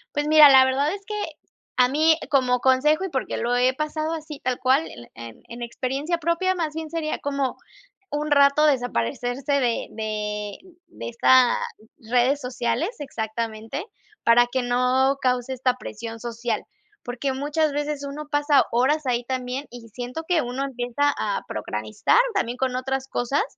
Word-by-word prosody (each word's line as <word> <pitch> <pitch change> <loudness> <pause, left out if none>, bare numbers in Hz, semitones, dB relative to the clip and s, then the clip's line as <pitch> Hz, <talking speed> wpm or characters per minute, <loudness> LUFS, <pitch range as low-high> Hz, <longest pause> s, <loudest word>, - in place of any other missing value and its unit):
Pues, 290 0 0
mira, 305 -1 +9
la 265 -1 +8
verdad 275 +5 +1
es 400 -1 -8
que 425 - -6 0.6
a 250 0 +4
mí, 315 +3 +4
como 250 -3 +2
consejo, 300 +6 +3
y 380 - -2
porque 265 -4 -3
lo 240 +1 -1
he 255 +1 +3
pasado 310 +2 -2
así 310 -2 -7
tal 255 -1 -1
cual, 265 +5 +2
el 120 -1 -12
en 115 -1 -11
en 235 +1 -8
experiencia 270 +8 -2
propia, 340 +3 +1
más 320 -3 -2
bien 320 -1 -5
sería 315 -1 -2
como 280 -2 -2 0.5
un 295 0 -2
rato 280 +1 +5
desaparecerse 245 - -1
de 245 -4 0
de 210 -2 -4 0.3
de 335 - -7
esta 250 +1 +4 0.4
redes 245 +4 +1
sociales. 250 - -2
Exactamente, 225 - -4 0.4
para 240 +1 +5
que 260 0 0
no 255 +3 +2
cause 250 0 0
esta 255 -1 +1
presión 230 -2 -8
social. 235 0 -3 0.4
Porque 255 +2 -3
muchas 295 +2 0
veces 290 -1 -3
uno 300 +1 -7
pasa 290 -1 +4
horas 270 +5 +2
ahí 240 -1 0
también 255 +2 -3
y 240 -1 -11
siento 250 +8 -6
que 350 -4 +3
uno 250 +3 -3
empieza 270 +2 0
a 205 -2 -1
procrastinar 110 - +1
también 245 -11 -1
con 260 -1 -1
otras 265 +1 -2
cosas, 275 - 0
260 Hz, 160 wpm, -24 LUFS, 245-295 Hz, 0.6 s, mira